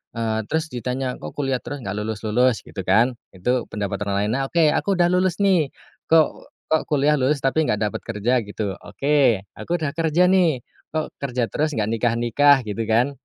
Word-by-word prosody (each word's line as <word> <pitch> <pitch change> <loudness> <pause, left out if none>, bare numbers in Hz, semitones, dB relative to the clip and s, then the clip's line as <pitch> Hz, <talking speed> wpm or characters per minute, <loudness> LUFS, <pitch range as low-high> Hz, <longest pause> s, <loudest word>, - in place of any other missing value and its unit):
eee, 110 -1 -1
terus 160 +1 -1
ditanya, 125 +2 -3
"Kok - - -7
kuliah 135 -3 -1
terus 145 - -5
nggak 95 - -4
lulus-lulus?" 110 +3 +1
Gitu 95 - -6
kan. 110 +7 +4 0.2
Itu 125 +7 -1
pendapat 100 -1 -3
orang 100 - 0
lain 105 - -1
nah, 135 - 0
oke 170 +3 +2
aku 195 +4 0
udah 175 -1 +3
lulus 180 -1 +2
nih, 180 -7 +3 0.4
"kok 160 -1 +2 0.2
kok 160 - +3
kuliah 150 0 +2
lulus 135 +2 +1
tapi 150 +3 +2
nggak 105 - 0
dapet 105 - -2
kerja?" 110 +2 0
Gitu, 105 +1 -4 0.2
oke 140 -8 +1 0.2
aku - - -7
udah 140 - 0
kerja 165 +2 +1
nih, 165 -10 +2 0.3
"kok 155 - 0
kerja 125 -3 -2
terus 155 +1 0
nggak 110 -2 0
nikah-nikah?" 120 +5 +3
Gitu 105 0 -6
kan, 120 +5 +2
130 Hz, 185 wpm, -22 LUFS, 110-155 Hz, 0.4 s, kan